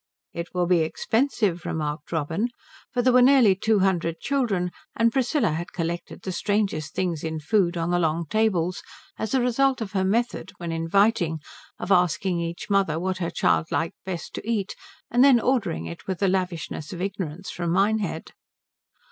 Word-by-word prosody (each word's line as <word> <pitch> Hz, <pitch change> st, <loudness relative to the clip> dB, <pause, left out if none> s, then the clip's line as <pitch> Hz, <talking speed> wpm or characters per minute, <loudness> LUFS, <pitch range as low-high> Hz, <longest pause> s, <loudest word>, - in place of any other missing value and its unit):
"It 170 Hz, +1 st, -6 dB
will 180 Hz, -1 st, +2 dB
be 175 Hz, -1 st, +3 dB
expensive," 200 Hz, -, 0 dB
remarked 150 Hz, -4 st, -4 dB
Robin; 160 Hz, +7 st, 0 dB, 0.4 s
for 245 Hz, -2 st, 0 dB
there 255 Hz, 0 st, +4 dB
were 250 Hz, -, +7 dB
nearly 250 Hz, -5 st, +6 dB
two 210 Hz, +2 st, +1 dB
hundred 170 Hz, -3 st, +1 dB
children, 210 Hz, -11 st, 0 dB, 0.2 s
and 230 Hz, +1 st, +3 dB
Priscilla 265 Hz, -, +1 dB
had 170 Hz, +3 st, -4 dB
collected 170 Hz, 0 st, -4 dB
the 190 Hz, -, -3 dB
strangest 195 Hz, -6 st, -1 dB
things 175 Hz, -5 st, -1 dB
in 160 Hz, -1 st, -3 dB
food 175 Hz, +1 st, +1 dB
on 170 Hz, +1 st, -1 dB
the 175 Hz, -, +2 dB
long 165 Hz, 0 st, 0 dB
tables 185 Hz, -4 st, +1 dB, 0.4 s
as 220 Hz, +4 st, -1 dB
a 260 Hz, -, +3 dB
result 260 Hz, +2 st, +2 dB
of 215 Hz, -3 st, -4 dB
her 190 Hz, -2 st, 0 dB
method, 210 Hz, -1 st, -1 dB
when 170 Hz, -1 st, -5 dB
inviting, 165 Hz, +1 st, +2 dB, 0.4 s
of -, -, -4 dB
asking 180 Hz, 0 st, +2 dB
each 170 Hz, 0 st, -4 dB
mother 195 Hz, -6 st, +2 dB
what 185 Hz, +1 st, -2 dB
her 170 Hz, -2 st, -1 dB
child 165 Hz, -1 st, +1 dB
best -, -, -25 dB, 0.4 s
liked 175 Hz, -4 st, -5 dB
to -, -, -5 dB
eat 205 Hz, -4 st, -1 dB, 0.4 s
and 245 Hz, +2 st, +5 dB
then 270 Hz, -3 st, +7 dB
ordering 225 Hz, -, 0 dB
it 85 Hz, 0 st, -9 dB
with 190 Hz, -2 st, -2 dB
the 195 Hz, -, +1 dB
lavishness 180 Hz, -5 st, -2 dB
of 175 Hz, -, -6 dB
ignorance 190 Hz, -2 st, -4 dB
from 175 Hz, -1 st, -3 dB
Minehead. 195 Hz, -2 st, 0 dB
185 Hz, 175 wpm, -25 LUFS, 170-220 Hz, 0.4 s, were